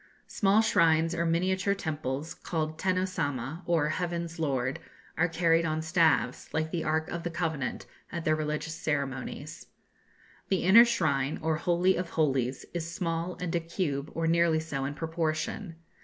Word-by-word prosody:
Small 205 +1 +3
shrines 165 -4 +3
or 170 0 0
miniature 185 +4 +1
temples, 155 -4 -3
called 155 -1 -3
Tenno 185 -1 +1
Samma, 150 -4 -3
or 160 -3 +2
"Heaven's 170 0 -3
Lord," 135 -4 -1 0.4
are 170 +3 +3
carried 165 0 +2
on 155 -1 -1
staves, 160 -7 +2
like 160 0 -1
the 170 -2 -1
Ark 160 +1 0
of 170 - -4
the 175 - -3
Covenant, 160 -5 -2 0.3
at 170 -1 -4
their 155 - +3
religious 155 +1 -2
ceremonies. 140 -1 -4 0.8
The 190 -3 +1
inner 215 +7 +8
shrine, 150 - 0
or 160 -1 +1
Holy 175 +3 +2
of 180 -1 -3
Holies, 135 -5 0
is 165 -1 -3
small, 170 0 -2
and 180 -2 -3
a 170 - +2
cube, 160 -4 -3
or 165 - 0
nearly 165 -1 +3
so, 140 -4 -3
in 145 +1 -4
proportion. 165 +3 -2
165 Hz, 155 wpm, -29 LUFS, 155-170 Hz, 0.8 s, inner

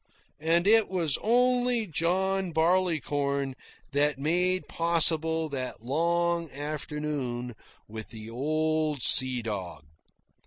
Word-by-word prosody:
And 165 +3 +1
it 220 +1 +4
was 170 -6 0
only 245 0 +2
John 185 +2 -1
Barleycorn 150 -5 0 0.4
that 145 0 +1
made 180 +6 0
possible 160 -1 +3
that 130 -5 -6
long 170 +4 0
afternoon 145 -4 -5 0.3
with 110 +1 -8
the 110 -1 -9
old 155 +3 -1
sea 130 -2 +4
dog. 95 -9 -6
155 Hz, 95 wpm, -27 LUFS, 135-175 Hz, 0.4 s, it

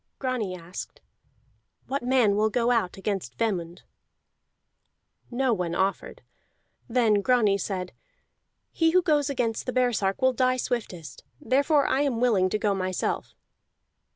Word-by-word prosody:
Grani 245 -8 -2
asked: 175 +1 -9 0.9
"What 275 +1 -3
man 245 -5 +3
will 215 +1 +2
go 240 +2 +1
out 220 -7 0
against 190 - -4
Vemund?" 180 -5 -2 1.5
No 255 0 +1
one 175 -4 -2
offered. 190 +2 -2 0.7
Then 225 -4 +3
Grani 215 -4 +3
said: 185 -2 -4 0.8
"He 325 -1 +2
who 365 0 +4
goes 300 -4 +2
against 240 -4 -2
the 255 - -2
baresark 230 -6 +1
will 260 0 +3
die 255 +1 +1
swiftest, 180 - -4 0.2
therefore 285 +2 +2
I 275 - +1
am 270 -5 0
willing 210 -7 +3
to 215 - 0
go 210 -1 0
myself." 185 -1 -3
225 Hz, 130 wpm, -26 LUFS, 190-255 Hz, 1.5 s, who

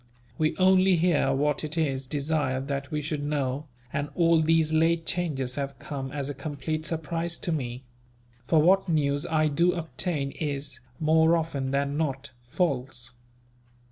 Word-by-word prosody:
We 155 0 +1
only 185 0 +5
hear 165 -5 +2
what 145 +2 +1
it 155 +2 -3
is 135 -4 0
desired 140 -2 -1
that 140 -1 -3
we 150 -1 -2
should 150 0 -2
know, 145 -1 -2 0.3
and 145 0 -2
all 165 -2 +4
these 160 0 +3
late 165 +1 +2
changes 150 -9 -1
have 140 -1 -3
come 135 -3 -5
as 140 -2 -3
a 145 - -3
complete 155 +3 -4
surprise 165 +1 -2
to 170 - -3
me; 125 -4 -3 0.6
for 160 +2 +4
what 190 +2 +4
news 145 -3 +1
I 155 -1 +2
do 170 +4 +2
obtain 160 -3 -2
is, 140 -4 -4 0.2
more 160 +1 +4
often 145 -5 -2
than 140 +1 0
not, 140 -3 -2 0.2
false. 125 -5 -1
150 Hz, 155 wpm, -27 LUFS, 140-165 Hz, 0.6 s, only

